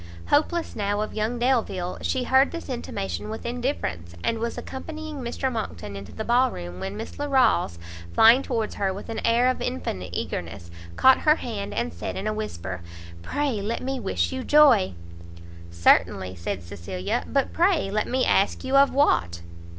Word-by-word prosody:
Hopeless, 325 +3 +1
now, 205 0 -1
of 215 - -4
young 220 +3 -1
Delvile, 230 -8 0
she 260 - 0
heard 265 +2 +4
this 335 -3 -7
intimation 95 - -4
with 220 - -6
indifference; 235 - -3
and 230 - 0
was 235 +1 -3
accompanying 310 +2 -7
Mr 260 +1 -2
Monckton 105 - -5
into 100 0 -8
the 220 - -5
ballroom, 165 - +1
when 95 +2 -5
Miss - - -7
Larolles, 255 - +2 0.3
flying 225 - +7
towards 230 -6 -2
her 195 -1 +2
with 195 +4 -8
an 225 - -3
air 235 +2 +3
of 255 - 0
infinite 90 +1 -3
eagerness, 85 0 -5 0.2
caught 265 0 +6
her 305 0 +4
hand, 215 -9 -5
and 80 - -2
said 85 - -5
in 195 - -4
a 215 - 0
whisper 95 - -5 0.4
"pray 260 - -1
let 220 +5 -3
me 265 0 -2
wish - - -1
you 260 -1 -4
joy!" 270 - +5 0.7
"Certainly!" 90 +2 +3
said 90 +1 -4
Cecilia, 85 +2 -3
"but 275 -1 0
pray 340 - +2
let 210 +1 0
me 255 +1 +1
ask 195 - +2
you 265 +1 +2
of 275 0 +6
what?" 90 - +2
220 Hz, 170 wpm, -25 LUFS, -, 0.7 s, flying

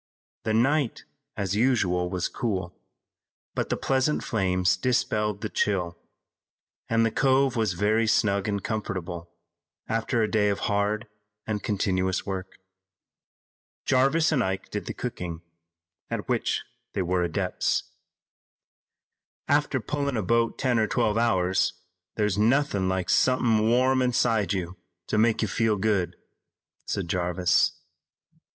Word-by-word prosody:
The 110 - +1
night, 135 +2 +1 0.3
as 100 -1 -1
usual, 100 -7 +2
was 90 -1 -1
cool, 95 -7 -3 0.8
but - - -2
the - - 0
pleasant 135 +3 +1
flames 95 -3 +1
dispelled 105 -1 0
the 110 - -2
chill, 90 -6 0 0.9
and 115 0 +3
the 115 - +1
cove 135 +1 +2
was 110 -5 +1
very 110 +5 +1
snug 100 -2 +2
and 100 -2 -2
comfortable 90 -6 -4 0.6
after 115 +1 0
a - - +2
day 105 -2 +2
of 100 - -2
hard 105 +2 0 0.4
and 105 -2 -2
continuous 95 -3 0
work. 95 -1 -5 1.3
Jarvis 135 +6 +3
and 135 -6 +2
Ike 95 0 -3
did 105 - -4
the - - -4
cooking, 90 -9 -5 0.7
at - - -4
which - - 0 0.3
they 95 - 0
were 90 0 0
adepts. 85 -2 0 1.6
"After 145 -2 +2
pullin' 140 +2 -2
a 110 - -1
boat 115 +4 +1
ten 125 -4 +1
or 110 - +2
twelve 105 +1 +1
hours 95 -6 +2 0.4
there's 105 -2 0
nothin' 115 -4 +2
like 95 -1 -1
somethin' 115 -4 +3
warm 130 +2 +3
inside 120 -4 +2
you 95 -2 -3 0.3
to 105 - 0
make 110 0 +3
you - - +1
feel 115 -2 +1
good," 100 -3 0 0.7
said 95 -3 -2
Jarvis. 90 0 +2
105 Hz, 130 wpm, -26 LUFS, 95-120 Hz, 1.6 s, and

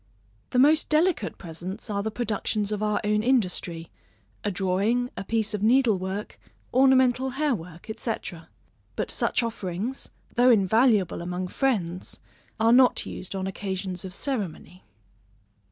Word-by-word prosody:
The - - -2
most 300 +4 +5
delicate 330 +3 +1
presents 175 +2 -7
are 200 -1 -1
the 220 - -2
productions 215 -2 -2
of 210 -1 -2
our 210 -1 +1
own 210 0 +2
industry; 180 -9 0 0.5
a 205 - 0
drawing, 200 +6 0
a - - -5
piece 220 0 -1
of 210 - -2
needle 230 -2 +4
work, 190 +3 -5 0.3
ornamental 260 0 +4
hair 300 -2 +2
work, 170 -4 -8
&c. 230 - -2 0.8
But - - -2
such - - +1
offerings, 220 +2 -4 0.2
though 245 +1 +5
invaluable 215 -3 +3
among 180 +1 -4
friends, 185 -10 -2 0.4
are 225 +1 +4
not 250 0 +5
used 185 +2 -6
on 190 -1 -2
occasions 190 -1 -4
of 190 - -6
ceremony. 190 - -5
210 Hz, 135 wpm, -26 LUFS, 185-245 Hz, 0.8 s, most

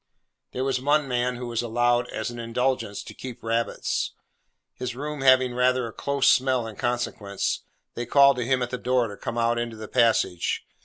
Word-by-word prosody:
There 130 - -3
was 130 -2 0
one 145 +1 +2
man 125 0 0
who 125 +1 -6
was 120 -1 -2
allowed, 120 +1 +1
as 110 +2 -3
an 120 - -8
indulgence, 120 -2 -1
to - - -10
keep 125 -2 -9
rabbits. 115 +1 -1 0.6
His 125 -1 -5
room 150 +2 -5
having 130 -2 +5
rather 125 0 +2
a 115 - -7
close 140 -1 0
smell 130 -2 +3
in 110 -2 -7
consequence, 110 -4 -2 0.3
they 120 0 -5
called 140 0 +6
to 125 - -1
him 130 +1 +1
at 120 - -4
the 125 - -3
door 125 -2 +1
to 100 - -8
come 115 - -5
out 120 0 +2
into 120 -1 -3
the 110 0 -7
passage. 115 -8 +1
120 Hz, 195 wpm, -25 LUFS, 115-130 Hz, 0.6 s, called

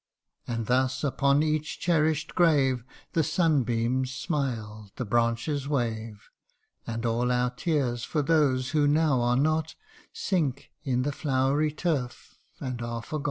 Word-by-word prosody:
And 115 -2 -2
thus 130 +3 +1
upon 140 +1 +2
each 155 0 -1
cherish 160 -3 +2
'd - - -14
grave 140 -8 +3 0.3
The 165 - +3
sunbeams 130 -6 +1
smile, 115 - -3
the 125 - -3
branches 120 +6 0
wave; 115 -6 -3 0.6
And 115 +1 -3
all 120 +2 +1
our 125 0 +1
tears 125 -5 -1
for 150 +2 -1
those 135 -4 +2
who 150 -2 +3
now 150 -3 +3
are 120 +1 +2
not, 155 +3 +1 0.4
Sink 145 -8 -1
in 130 -4 0
the 145 - 0
flowery 140 +2 +1
turf 145 -6 -3 0.2
and 125 -2 -4
are 115 0 -4
forgot 155 +6 -4
130 Hz, 140 wpm, -27 LUFS, 120-150 Hz, 0.6 s, grave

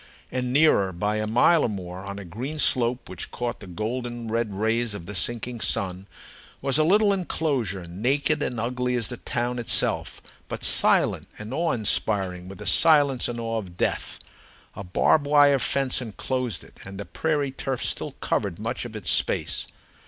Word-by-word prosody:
And 125 -1 -2
nearer, 130 -9 +4
by 105 +4 -1
a 110 0 -1
mile 145 +9 +4
or - - +1
more, 90 -3 -6
on 100 0 -6
a 100 - -7
green 125 - -5
slope 125 -3 +2
which 90 -2 -6
caught 120 -1 -4
the - - -11
golden 120 +5 -4
red 115 -1 0
rays 110 +2 0
of 90 -4 -7
the 105 - -7
sinking 120 +5 -1
sun, 95 -3 0 0.5
was 135 +2 +2
a - - +5
little 200 +5 +4
enclosure, 135 - -1
naked 135 - 0
and 120 -5 -2
ugly 125 +2 -1
as 115 -3 0
the 125 - -6
town 120 +1 -2
itself, 120 - 0 0.3
but - - -5
silent - - +3
and 105 +3 -7
awe 165 +3 +1
inspiring 95 -5 0
with 95 - -9
the 105 - -8
silence 140 - +4
and 120 -1 -4
awe 115 -1 -2
of 90 -4 -10
death. - - -1 0.6
A - - -6
barbed 140 - +2
wire 145 -1 +6
fence 135 +1 +1
enclosed 120 -3 -3
it, - - -18
and 95 0 -8
the 100 - -5
prairie 150 -4 -1
turf 135 -1 -3
still - - -2
covered 95 -5 -2
much 115 +4 -3
of 115 -2 -8
its 95 -7 -1
space. - - 0
120 Hz, 180 wpm, -25 LUFS, 100-130 Hz, 0.6 s, wire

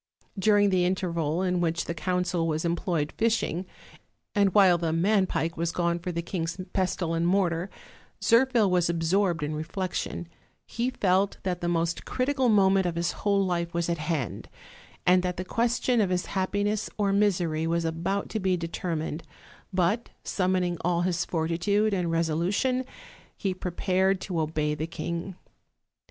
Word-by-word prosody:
During 205 0 +4
the 185 -1 +3
interval 175 -2 0
in 180 -1 +1
which 170 0 0
the 170 - -3
council 180 0 -1
was 160 +1 -1
employed 170 -3 -1
fishing, 220 -5 0 0.7
and 200 -2 +3
while 185 -4 +5
the 165 -1 0
man 190 +4 +2
pike 165 -1 -1
was 165 0 -1
gone 170 0 0
for 180 +1 -4
the 170 0 -3
king's 165 0 -3
pestle 180 -3 0
and 165 +1 +1
mortar, 180 -1 +1 0.5
Zirphil 235 -2 +4
was 180 -2 +2
absorbed 170 0 +1
in 150 +1 -2
reflection; 175 +2 -3 0.4
he 235 +2 -2
felt 195 -4 +1
that 180 -2 -2
the 175 - -1
most 170 -1 0
critical 260 -1 0
moment 195 -3 +4
of 170 - -2
his 170 0 0
whole 200 -1 +1
life 170 -1 -2
was 170 0 0
at 170 -2 -1
hand, 150 -5 -3 0.6
and 180 0 +5
that 180 -1 -2
the 185 - -4
question 235 +3 +1
of 195 - +1
his 180 -1 0
happiness 205 +2 -1
or 200 -2 +1
misery 175 -6 +1
was 170 0 0
about 170 +5 -1
to 220 - -2
be 185 -2 +1
determined; 165 -2 -3 0.5
but, 190 +5 +1
summoning 185 -2 0
all 175 0 +1
his 180 0 0
fortitude 175 +6 +1
and 180 -3 0
resolution, 175 +11 0 0.5
he 195 -2 -1
prepared 185 +1 0
to 180 -3 -3
obey 155 -1 -1
the 155 +2 -3
king. 170 +2 -4
180 Hz, 160 wpm, -27 LUFS, 170-195 Hz, 0.7 s, while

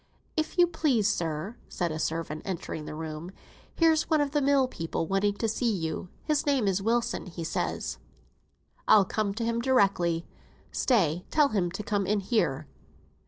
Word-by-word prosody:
"If 315 +3 -2
you 350 - +7
please, 300 - +1
sir," 170 +2 -2
said 175 -2 -2
a 155 - -4
servant, 160 -1 -2
entering 170 -4 -4
the 150 - -6
room, 160 +1 -6 0.5
"here's 325 -2 +3
one 315 - +4
of 290 -1 +1
the 295 0 +1
mill 275 -1 +3
people 165 -7 -3
wanting 195 +3 +1
to 225 - -1
see 230 +2 0
you; 165 -2 -3
his 300 -2 +1
name 270 -7 +2
is 195 0 +1
Wilson, 230 0 0
he 170 -1 -6
says." 160 - -2 0.9
"I'll 205 -3 +7
come 210 +1 -1
to 230 +1 -2
him 230 0 0
directly; 195 -9 +2 0.5
stay, 180 - +2
tell 300 -2 +4
him 190 -6 0
to 195 +4 -5
come 200 -2 -1
in 210 0 +2
here." 170 - 0
205 Hz, 170 wpm, -28 LUFS, 170-250 Hz, 0.9 s, you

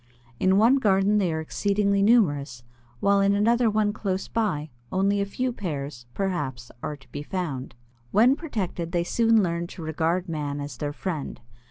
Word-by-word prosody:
In 190 +1 +3
one 235 +6 +5
garden 205 -3 +3
they 185 -4 +1
are 160 - -2
exceedingly 200 +4 +1
numerous, 145 - +2 0.4
while 200 0 +4
in 200 0 +3
another 230 +3 +3
one 210 -1 +1
close 195 -3 -2
by, 185 -10 -1 0.2
only 200 +2 +2
a 200 - -1
few 250 +5 -2
pairs, 145 - -5
perhaps, 145 -11 -3
are 150 - -4
to 135 - -21
be 145 - -5
found. 150 -7 -4 0.3
When 235 - +5
protected, 190 - -4
they 170 -1 +2
soon 225 +3 +3
learn 170 -1 -1
to 170 - -9
regard 165 +3 -1
man 145 -3 -3
as 145 -4 -6
their 145 -1 -3
friend. 160 -1 -4
185 Hz, 170 wpm, -25 LUFS, 150-205 Hz, 0.4 s, one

